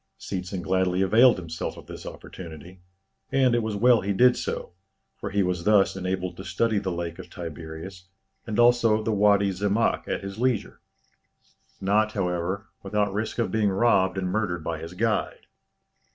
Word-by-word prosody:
Seetzen 90 Hz, -1 st, -5 dB
gladly 95 Hz, 0 st, +1 dB
availed 115 Hz, +5 st, +5 dB
himself 85 Hz, -2 st, -5 dB
of -, -, -11 dB
this -, -, -9 dB
opportunity; 85 Hz, +1 st, -10 dB, 0.5 s
and 135 Hz, -2 st, +3 dB
it 120 Hz, -, +2 dB
was 110 Hz, -2 st, -3 dB
well 120 Hz, +3 st, +5 dB
he 100 Hz, +1 st, -1 dB
did 125 Hz, +5 st, +5 dB
so, -, -, -4 dB, 0.4 s
for -, -, -5 dB
he 100 Hz, 0 st, +1 dB
was 90 Hz, -2 st, -1 dB
thus 100 Hz, -1 st, +4 dB
enabled 90 Hz, -1 st, -3 dB
to -, -, -7 dB
study 105 Hz, +5 st, 0 dB
the 95 Hz, -2 st, -3 dB
Lake 85 Hz, -1 st, -4 dB
of -, -, -9 dB
Tiberias 85 Hz, +2 st, -8 dB, 0.4 s
and 110 Hz, -, -3 dB
also 120 Hz, -2 st, +4 dB
the 110 Hz, -, 0 dB
Wady 100 Hz, -1 st, +4 dB
Zemmâk 100 Hz, +4 st, 0 dB
at -, -, -3 dB
his 100 Hz, +2 st, -7 dB
leisure, 125 Hz, -2 st, -1 dB, 1.0 s
not, 105 Hz, +3 st, +2 dB
however, 90 Hz, +3 st, -2 dB, 0.2 s
without 105 Hz, 0 st, -1 dB
risk 110 Hz, +2 st, -3 dB
of 115 Hz, -, 0 dB
being 110 Hz, -2 st, +2 dB
robbed 95 Hz, -2 st, +2 dB
and 95 Hz, -1 st, -1 dB
murdered 95 Hz, -5 st, -1 dB
by 80 Hz, -1 st, -3 dB
his 85 Hz, +3 st, -8 dB
guide. 110 Hz, 0 st, -1 dB
100 Hz, 165 wpm, -26 LUFS, 90-110 Hz, 1.0 s, availed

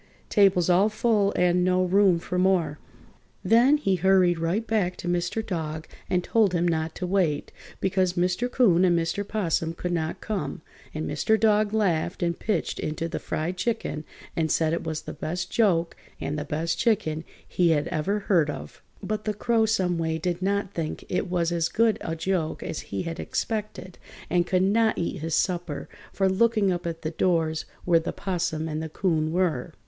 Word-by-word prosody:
Table's 195 Hz, -5 st, +4 dB
all 185 Hz, +4 st, +4 dB
full 215 Hz, -2 st, +2 dB
and 180 Hz, 0 st, +3 dB
no 185 Hz, 0 st, +2 dB
room 190 Hz, -1 st, +4 dB
for 180 Hz, +2 st, -3 dB
more!" 180 Hz, -5 st, +2 dB, 0.6 s
Then 245 Hz, +6 st, +5 dB
he 195 Hz, -10 st, +1 dB
hurried 180 Hz, -1 st, +3 dB
right 175 Hz, +7 st, 0 dB
back 200 Hz, -6 st, 0 dB
to -, -, -6 dB
Mr. 175 Hz, +5 st, -1 dB
Dog 160 Hz, -3 st, -4 dB, 0.2 s
and 180 Hz, -1 st, +1 dB
told 215 Hz, -3 st, +2 dB
him 175 Hz, 0 st, +1 dB
not 160 Hz, -1 st, -1 dB
to 180 Hz, -, -3 dB
wait, 180 Hz, -6 st, 0 dB, 0.3 s
because 190 Hz, -2 st, +1 dB
Mr. 180 Hz, +7 st, 0 dB
'Coon 190 Hz, -9 st, +4 dB
and 175 Hz, -2 st, +4 dB
Mr. 165 Hz, +4 st, -1 dB
'Possum 165 Hz, -6 st, -1 dB
could 180 Hz, +1 st, -3 dB
not 160 Hz, -2 st, -2 dB
come, 200 Hz, -6 st, -4 dB, 0.3 s
and 155 Hz, 0 st, -4 dB
Mr. 215 Hz, +9 st, +1 dB
Dog 215 Hz, -1 st, +3 dB
laughed 180 Hz, -5 st, 0 dB
and 170 Hz, -1 st, -1 dB
pitched 215 Hz, -, -1 dB
into 155 Hz, +2 st, -3 dB
the 170 Hz, -, -4 dB
fried 170 Hz, +4 st, -3 dB
chicken 185 Hz, -6 st, -2 dB, 0.3 s
and 160 Hz, -1 st, 0 dB
said 160 Hz, -1 st, +2 dB
it 170 Hz, -, -2 dB
was 155 Hz, -1 st, -4 dB
the -, -, -7 dB
best 175 Hz, +2 st, -4 dB
joke 175 Hz, -7 st, +2 dB, 0.2 s
and 145 Hz, -, -3 dB
the 150 Hz, -1 st, -3 dB
best 160 Hz, +3 st, -2 dB
chicken 190 Hz, -9 st, +1 dB, 0.2 s
he 175 Hz, -2 st, +2 dB
had 150 Hz, -2 st, +2 dB
ever 200 Hz, +7 st, -1 dB
heard 170 Hz, -7 st, +2 dB
of. 75 Hz, -, -7 dB, 0.2 s
But 215 Hz, 0 st, -3 dB
the 215 Hz, -1 st, -1 dB
Crow 225 Hz, +1 st, +2 dB
some 185 Hz, -6 st, +1 dB
way 160 Hz, -1 st, -1 dB
did 175 Hz, +2 st, -2 dB
not 200 Hz, 0 st, -1 dB
think 160 Hz, -2 st, -4 dB
it 180 Hz, -, -1 dB
was 175 Hz, -1 st, 0 dB
as 170 Hz, -1 st, 0 dB
good 225 Hz, -1 st, +2 dB
a 165 Hz, -, -3 dB
joke 165 Hz, -1 st, -2 dB
as -, -, -4 dB
he 100 Hz, -, -2 dB
had 165 Hz, 0 st, -5 dB
expected 210 Hz, -5 st, -4 dB, 0.3 s
and 175 Hz, -1 st, +2 dB
could 185 Hz, 0 st, +2 dB
not 220 Hz, +3 st, +2 dB
eat 175 Hz, +2 st, -2 dB
his 160 Hz, 0 st, -1 dB
supper 175 Hz, -5 st, -1 dB, 0.2 s
for 195 Hz, -, +1 dB
looking 210 Hz, 0 st, +2 dB
up 175 Hz, -1 st, -2 dB
at 165 Hz, -1 st, -5 dB
the 155 Hz, -, -2 dB
doors 160 Hz, -2 st, 0 dB, 0.2 s
where 170 Hz, -2 st, +4 dB
the 165 Hz, -, -4 dB
'Possum 175 Hz, -4 st, -2 dB
and 155 Hz, 0 st, -3 dB
the 160 Hz, -, -5 dB
'Coon 155 Hz, -2 st, 0 dB
were. 170 Hz, -7 st, 0 dB
180 Hz, 190 wpm, -26 LUFS, 165-200 Hz, 0.6 s, Then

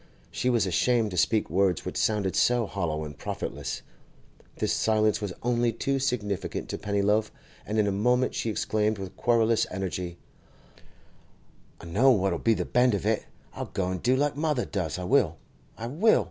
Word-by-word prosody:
She 125 Hz, -, -1 dB
was 120 Hz, -5 st, +2 dB
ashamed 110 Hz, +4 st, +2 dB
to -, -, -5 dB
speak 110 Hz, +5 st, +2 dB
words 95 Hz, 0 st, +1 dB
which -, -, -4 dB
sounded 105 Hz, -4 st, 0 dB
so 120 Hz, -1 st, +3 dB
hollow 85 Hz, -6 st, -2 dB
and 75 Hz, -1 st, -7 dB
profitless. -, -, -5 dB, 0.7 s
This -, -, 0 dB
silence 110 Hz, -2 st, +2 dB
was 100 Hz, -3 st, -3 dB
only 120 Hz, -1 st, +2 dB
too 135 Hz, +4 st, -1 dB
significant 105 Hz, -8 st, -2 dB
to -, -, -4 dB
Pennyloaf, 105 Hz, +1 st, +1 dB, 0.4 s
and 110 Hz, -, -2 dB
in 105 Hz, -, +3 dB
a 100 Hz, -, +1 dB
moment 125 Hz, +6 st, +2 dB
she 115 Hz, -, -2 dB
exclaimed 110 Hz, 0 st, 0 dB
with 95 Hz, -1 st, -7 dB
querulous 115 Hz, -2 st, +2 dB
energy: 90 Hz, -2 st, -4 dB, 1.6 s
'I -, -, -10 dB
know 105 Hz, +11 st, +3 dB
what'll 95 Hz, -8 st, +2 dB
be 115 Hz, -1 st, +3 dB
the -, -, -2 dB
bend 125 Hz, -2 st, +3 dB
of 100 Hz, -, -4 dB
it! -, -, 0 dB, 0.3 s
I'll -, -, -4 dB
go 95 Hz, -2 st, 0 dB
an' 95 Hz, -, -3 dB
do 125 Hz, +8 st, +2 dB
like 145 Hz, +1 st, +1 dB
mother 150 Hz, -4 st, 0 dB
does—I 90 Hz, -3 st, -3 dB
will! 90 Hz, -, +2 dB, 0.4 s
I 115 Hz, -, -5 dB
will! 165 Hz, -, +3 dB
105 Hz, 175 wpm, -27 LUFS, 95-120 Hz, 1.6 s, so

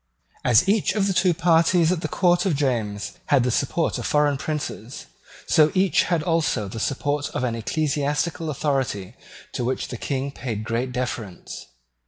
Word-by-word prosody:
As 120 Hz, -, +4 dB
each 205 Hz, 0 st, +2 dB
of 205 Hz, -2 st, +2 dB
the 195 Hz, -, +1 dB
two 185 Hz, 0 st, +3 dB
parties 170 Hz, 0 st, +3 dB
at 180 Hz, -3 st, -1 dB
the -, -, -2 dB
Court 175 Hz, 0 st, +2 dB
of 170 Hz, -, +1 dB
James 115 Hz, -8 st, -2 dB
had 140 Hz, -4 st, +4 dB
the 125 Hz, -, +1 dB
support 145 Hz, +7 st, 0 dB
of -, -, -3 dB
foreign 150 Hz, -1 st, +2 dB
princes, 135 Hz, -5 st, -5 dB, 0.4 s
so 155 Hz, -1 st, +4 dB
each 190 Hz, -1 st, +3 dB
had 170 Hz, -4 st, 0 dB
also 160 Hz, -, 0 dB
the 110 Hz, +4 st, -6 dB
support 145 Hz, +4 st, -1 dB
of -, -, -1 dB
an 120 Hz, -2 st, 0 dB
ecclesiastical 150 Hz, +6 st, -1 dB
authority 130 Hz, -9 st, -2 dB, 0.4 s
to 125 Hz, -, -2 dB
which 130 Hz, +2 st, -2 dB
the 125 Hz, -, -5 dB
King 135 Hz, +2 st, -3 dB
paid 115 Hz, -6 st, -5 dB
great 115 Hz, +3 st, -2 dB
deference. 120 Hz, -6 st, -5 dB
145 Hz, 170 wpm, -23 LUFS, 125-165 Hz, 0.4 s, As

